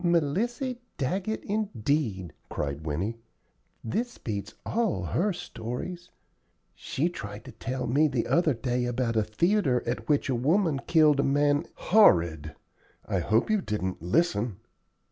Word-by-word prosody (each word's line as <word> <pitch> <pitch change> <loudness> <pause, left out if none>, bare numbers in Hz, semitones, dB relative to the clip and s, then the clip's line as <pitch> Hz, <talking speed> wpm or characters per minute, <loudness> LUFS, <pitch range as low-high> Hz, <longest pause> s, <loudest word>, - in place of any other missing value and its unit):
"Melissy 205 - 0 0.2
Daggett, 185 +10 -2
indeed!" 140 - -1 0.2
cried 75 +2 -4
Winnie. 95 +10 -2 0.6
"This 240 - -2
beats 100 -3 -5
all 225 -4 0
her 205 +5 +1
stories. 170 +4 -6 0.6
She 150 +6 -2
tried 105 - -7
to 130 - -9
tell 125 +3 -4
me 140 +6 +3
the 125 -5 -1
other 165 -5 +2
day 125 +1 -1
about 120 -1 -1
a 110 - +4
theatre 135 - +1
at 120 +6 -3
which 145 -2 +2
a 135 - +1
woman 150 - +2
killed 155 -4 +5
a - - +4
man 145 +2 +2
" - - -37 0.2
"Horrid! 85 - +5 0.5
I 95 - 0
hope 110 - +2
you 215 -2 +2
didn't 95 - -3
listen?" 110 - +1
135 Hz, 140 wpm, -28 LUFS, 110-175 Hz, 0.6 s, killed